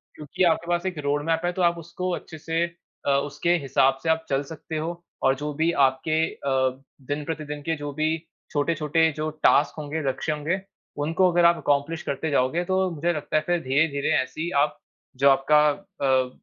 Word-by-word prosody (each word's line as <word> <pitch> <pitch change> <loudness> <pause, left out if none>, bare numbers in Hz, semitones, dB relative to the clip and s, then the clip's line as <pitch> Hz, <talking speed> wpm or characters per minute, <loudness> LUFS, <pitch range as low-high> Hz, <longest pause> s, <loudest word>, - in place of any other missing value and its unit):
क्योंकि 165 +5 -2
आपके 170 -1 +2
पास 175 +1 0
एक 185 -3 -2
रोडमैप 145 +3 +1
है, 175 - +1
तो 185 - -3
आप 170 -1 +3
उसको 170 +2 -4
अच्छे 160 - -9
से 165 +2 -1 0.4
अ, - - +3
उसके 145 +5 +1
हिसाब 135 -2 +2
से 165 - 0
आप 160 0 +1
चल 135 +1 +1
सकते 160 +2 -7
हो 170 +2 -4 0.2
और 135 0 +4
जो 150 +2 -4
भी 160 +3 +1 0.2
आपके 130 +4 -4 0.2
अ, 130 -1 0 0.2
दिन-प्रतिदिन 150 +2 -4
के 160 +3 -1
जो 145 0 -5
भी 155 +2 0 0.3
छोटे-छोटे 160 +1 +1
जो 155 +1 -2
टास्क 145 0 +4
होंगे, 155 +1 -3
लक्ष्य 145 +4 -2
होंगे, 155 +5 -1 0.4
उनको 165 +5 +2
अगर 175 0 +4
आप 170 0 +6
अकम्प्लिश 145 +3 0
करते 155 +3 -2
जाओगे, 140 +5 +1
तो 190 0 +1
मुझे 170 +2 0
लगता 155 -1 -4
है, - - +3
फिर 175 0 +2
धीरे-धीरे 140 +2 +1
ऐसी 130 - -6
ही 170 - -1
आप 150 0 -2 0.4
जो 140 +2 +5
आपका 140 +2 +4
अ, 140 -8 0
155 Hz, 190 wpm, -25 LUFS, 140-170 Hz, 0.4 s, आप